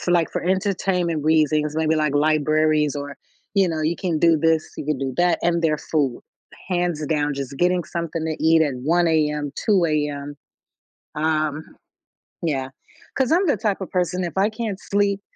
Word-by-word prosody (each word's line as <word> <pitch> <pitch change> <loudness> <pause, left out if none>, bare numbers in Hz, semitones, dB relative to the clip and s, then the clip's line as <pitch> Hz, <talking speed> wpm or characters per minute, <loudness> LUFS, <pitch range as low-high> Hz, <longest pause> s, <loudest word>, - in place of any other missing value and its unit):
for, 175 - -2
like, 170 -2 +3
for - - -3
entertainment 180 -3 0
reasons, 155 -1 +2
maybe 160 0 +2
like 155 -2 0
libraries 155 0 +2
or, 145 0 -6 0.4
you 195 -2 +3
know, 160 -1 -2
you 160 +2 0
can 175 -5 -1
do 165 0 +4
this, 160 0 +1
you - - -5
can 150 -3 -1
do 135 -2 -3
that, 175 0 +2
and 170 0 +1
their 155 -2 +1
food, 140 -6 -1 0.5
hands 175 -4 -1
down, 150 -1 0
just 140 0 -5
getting 180 0 +2
something 165 -1 -4
to 160 -1 -3
eat 160 0 +5
at 145 -4 0
1 170 +4 +2
AM, 150 -2 0
2 195 -5 +3
AM, 145 -2 -2 0.8
um, 155 -1 0 0.8
yeah, 135 -5 -2 0.5
'cause 265 0 +1
I'm 365 +4 +3
the 290 - +2
type 205 -3 -1
of 190 - -6
person, 180 0 0
if 170 - -4
I 200 +3 +3
can't 215 -3 -4
sleep 200 0 0
160 Hz, 180 wpm, -22 LUFS, 150-180 Hz, 0.8 s, eat